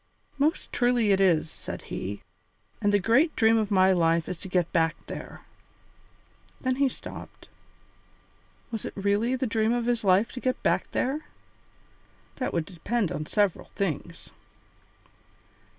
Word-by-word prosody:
"Most 300 +3 0
truly 245 -3 +3
it 195 0 +3
is," 165 -5 +3
said - - -7
he, 100 +2 -5 0.6
"and 205 -1 +3
the 205 - +5
great 240 - +3
dream 225 -1 +4
of 215 -2 -1
my 190 -2 +5
life 165 -2 +2
is 175 - -5
to - - -6
get 180 -2 0
back 165 -2 +2
there." - - -8 1.2
Then 255 -1 -1
he 275 -1 +3
stopped. - - -10 1.2
Was 225 -2 -3
it - - -5
really 205 +5 +1
the 260 - -1
dream 220 -1 +1
of 240 -1 0
his 240 -2 0
life 195 +3 +3
to 255 - -6
get 255 0 -2
back - - +1
there? 285 +4 -1 1.1
That 255 - -2
would 170 -2 -1
depend 200 +3 -2
upon 150 - -4
several 205 -4 +1
things. 170 -2 -4
205 Hz, 150 wpm, -27 LUFS, 180-240 Hz, 1.2 s, the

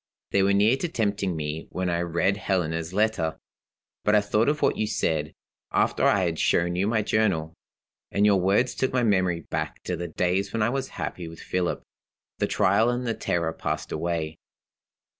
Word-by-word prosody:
They 100 - +3
were 100 +1 +3
near 105 +6 +4
to 175 - -2
tempting 100 - -1
me 75 0 -4
when 90 0 -2
I 85 -1 0
read 85 +3 +1
Helena's 85 -5 -1
letter. 95 -7 0 0.7
But 105 - +3
I 105 - +5
thought 105 +4 +2
of 150 0 -1
what - - +3
you 110 - -1
said, 80 -7 -1 0.4
after - - +2
I 100 - +4
had 85 -3 -1
shown 85 +1 +2
you 95 +3 +1
my 110 -1 +1
Journal; 95 -8 +1 0.6
and 100 +1 +2
your 100 -3 +4
words 100 +7 +2
took 130 - -1
my 125 -1 +1
memory 95 -6 +2
back - - -4
to 90 - -2
the 85 +1 -4
days 90 +4 0
when 115 -2 +1
I 110 - +2
was 135 0 -2
happy 85 -2 -4
with 80 0 -10
Philip. 90 -1 -2 0.6
The - - +1
trial 105 +5 +3
and 125 +1 -1
the 115 - 0
terror 85 -6 -1
passed - - -3
away. 80 -1 -2
95 Hz, 190 wpm, -26 LUFS, 85-105 Hz, 0.7 s, I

